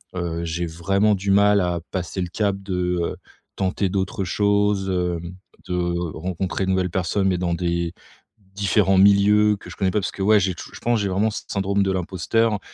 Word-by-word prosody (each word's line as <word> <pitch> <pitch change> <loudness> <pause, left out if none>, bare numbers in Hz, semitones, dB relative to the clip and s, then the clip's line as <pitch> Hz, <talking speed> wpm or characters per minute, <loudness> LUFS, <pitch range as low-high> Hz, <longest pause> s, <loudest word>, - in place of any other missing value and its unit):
Heu, 85 -1 -3
j'ai 85 +1 -2
vraiment 100 +6 +1
du 100 +1 -2
mal 100 +1 +5
à 90 -1 -1
passer 95 0 -3
le 90 - -2
cap 100 +1 0
de, 95 -2 -4 0.3
heu, - - -3 0.4
tenter 95 +1 -1
d'autres 95 0 -2
choses, 100 +1 +1
hem, 90 -1 -2 0.3
de 90 - -1 0.4
rencontrer 95 +3 -2
de 95 - 0
nouvelles 95 -1 +1
personnes, 95 +2 0
mais 90 - +1
dans 85 -1 0
des 85 -1 -1 0.6
différents 95 -1 +2
milieux 105 +1 +5
que - - -12
je - - -9
connais 95 -2 +1
pas 105 - +1
parce - - -3
que, - - -8
ouais, 105 +1 +5
j'ai 95 -1 0
touj - - -10
je - - -9
pense, 120 -2 +1
j'ai 100 - 0
vraiment 105 +4 +1
ce - - -5
syndrome 100 0 0
de 95 - 0
l'imposteur 95 +4 0
95 Hz, 200 wpm, -22 LUFS, 90-100 Hz, 0.6 s, mal